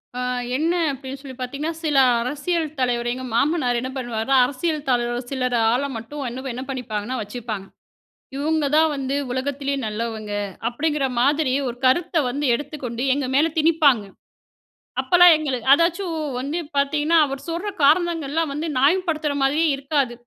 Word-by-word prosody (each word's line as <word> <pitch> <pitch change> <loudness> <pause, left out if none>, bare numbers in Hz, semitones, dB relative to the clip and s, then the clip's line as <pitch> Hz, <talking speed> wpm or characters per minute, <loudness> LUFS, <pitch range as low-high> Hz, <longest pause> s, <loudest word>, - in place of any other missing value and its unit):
ஆ - - -3 0.4
என்ன 325 +4 +1 0.2
அப்டினு 270 0 -7
சொல்லி 265 -3 -9
பாத்தீங்கன்னா. 280 +6 -3
சில 295 -3 +1 0.2
அரசியல் 305 +6 -1
தலைவர் 240 -1 0
எங்க 260 +1 -6
மாமனாரு 250 -3 +1
என்ன 255 - -4
பண்ணுவாருனா. 240 +1 -1
அரசியல் 290 +2 -3
தலைவர் 240 0 0
சிலர் 255 -2 -1 0.2
ஆள 245 +3 +1 0.2
மட்டும் 275 +6 -7
என்ன 260 +2 -5
என்ன 255 - -5
பண்ணிப்பாங்கன்னா 250 -2 -3
வச்சுப்பாங்க. 215 -2 -6 0.7
"இவுங்க 305 +2 0
தான் 320 0 +5
வந்து 270 0 -2 0.2
உலகத்திலே 280 +2 -2
நல்லவங்க" 215 -1 -4 0.4
அப்டிங்கிற 295 +3 -1 0.2
மாதிரி 280 0 +2
ஒரு 240 - -5
கருத்த 345 +7 +2
வந்து 285 +4 -2
எடுத்துக்கொண்டு 255 -4 -5
எங்க 280 -2 -2
மேல 310 +3 +4
திணிப்பாங்க. 300 - +4 1.0
அப்பலாம் 355 -1 +7
எங்களுக்கு 265 -5 -2
அதாச்சும் 335 +1 +1 0.2
வந்து 280 +6 -3 0.2
பாத்தீங்கன்னா 295 +3 +2
அவர் 275 -1 -5
சொல்ற 345 +5 -3 0.2
காரணங்கள்லாம் 320 -1 +2
வந்து 310 +3 -3
நியாய 280 +7 +5
படுத்துற 310 -3 -1
மாரியே 300 +4 +2
இருக்காது. 275 -2 -1
275 Hz, 140 wpm, -22 LUFS, 250-310 Hz, 1.0 s, அப்பலாம்